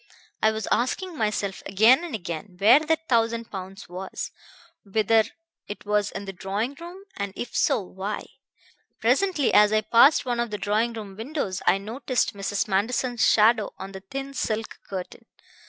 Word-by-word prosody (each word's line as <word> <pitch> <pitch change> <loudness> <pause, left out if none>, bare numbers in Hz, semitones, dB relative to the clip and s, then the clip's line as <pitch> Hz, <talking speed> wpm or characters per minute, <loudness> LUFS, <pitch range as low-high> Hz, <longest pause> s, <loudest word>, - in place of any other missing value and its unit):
I 220 - +5
was 220 0 -3
asking 345 +9 0
myself 210 -5 -2
again 225 - +5
and 330 -9 -4
again 180 0 -6
where 220 +8 +7
that 320 +1 -1
thousand 230 -1 +1
pounds 190 +1 -8
was; 185 +2 -6 0.5
whether 220 +2 +3 0.4
it 205 - -8
was 210 0 +1
in 200 - -7
the 195 - -6
drawing 205 +8 -3
room; 350 +3 -10
and 200 -1 -3
if 240 - -6
so, - - +3
why. 190 +2 -5 0.7
Presently, 285 - +2
as 210 0 +6
I 215 0 +3
passed 240 +7 +5
one 240 -1 -1
of 235 0 0
the 210 - -3
drawing 215 +4 0
room 210 -4 -8
windows, 225 -5 -3
I 180 +2 +5
noticed 230 +4 -1
Mrs. 200 +2 -2
Manderson's 235 +4 0
shadow 220 0 +3
on 195 - -7
the 190 - -8
thin 270 +7 -6
silk 225 -3 -3
curtain. 185 -2 -7
220 Hz, 165 wpm, -25 LUFS, 195-245 Hz, 0.7 s, where